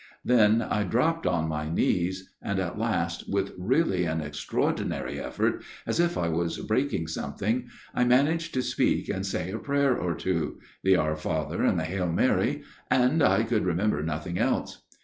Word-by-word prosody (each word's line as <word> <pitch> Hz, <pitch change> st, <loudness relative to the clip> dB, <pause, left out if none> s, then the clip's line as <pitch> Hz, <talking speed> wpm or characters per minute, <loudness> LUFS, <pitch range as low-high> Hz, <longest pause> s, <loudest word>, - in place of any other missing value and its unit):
" -, -, -37 dB
Then 110 Hz, -1 st, +5 dB
I 105 Hz, -, 0 dB
dropped 140 Hz, -, +1 dB
on 80 Hz, -2 st, +1 dB
my 75 Hz, -1 st, -3 dB
knees; 90 Hz, +3 st, 0 dB
and 100 Hz, -, -2 dB
at 90 Hz, +2 st, -3 dB
last, 85 Hz, -7 st, -1 dB
with 100 Hz, 0 st, 0 dB
really 95 Hz, -, +1 dB
an 80 Hz, -1 st, -1 dB
extraordinary 75 Hz, -1 st, -2 dB
effort, -, -, -1 dB, 0.2 s
as -, -, -1 dB
if 170 Hz, 0 st, +2 dB
I 85 Hz, -, 0 dB
was 85 Hz, 0 st, -1 dB
breaking 110 Hz, -, 0 dB
something, 105 Hz, -, -2 dB, 0.3 s
I 125 Hz, -, +2 dB
managed 150 Hz, +7 st, +3 dB
to 130 Hz, -, +1 dB
speak -, -, +1 dB
and 95 Hz, -1 st, -2 dB
say\ 95 Hz, -2 st, -2 dB
a 110 Hz, -, -4 dB
prayer 140 Hz, -2 st, +2 dB
or 90 Hz, -6 st, -1 dB
two, 85 Hz, -4 st, -2 dB, 0.3 s
the 95 Hz, 0 st, +5 dB
Our 75 Hz, -2 st, +1 dB
Father 75 Hz, +1 st, -2 dB
and 90 Hz, -, +3 dB
the -, -, -1 dB
Hail\ 90 Hz, +1 st, -1 dB
Mary 85 Hz, -, +1 dB, 0.3 s
I 130 Hz, 0 st, +4 dB
could 115 Hz, -2 st, +1 dB
remember 90 Hz, -1 st, +1 dB
nothing 80 Hz, +2 st, -3 dB
else. -, -, -1 dB
95 Hz, 170 wpm, -27 LUFS, 85-125 Hz, 0.3 s, Then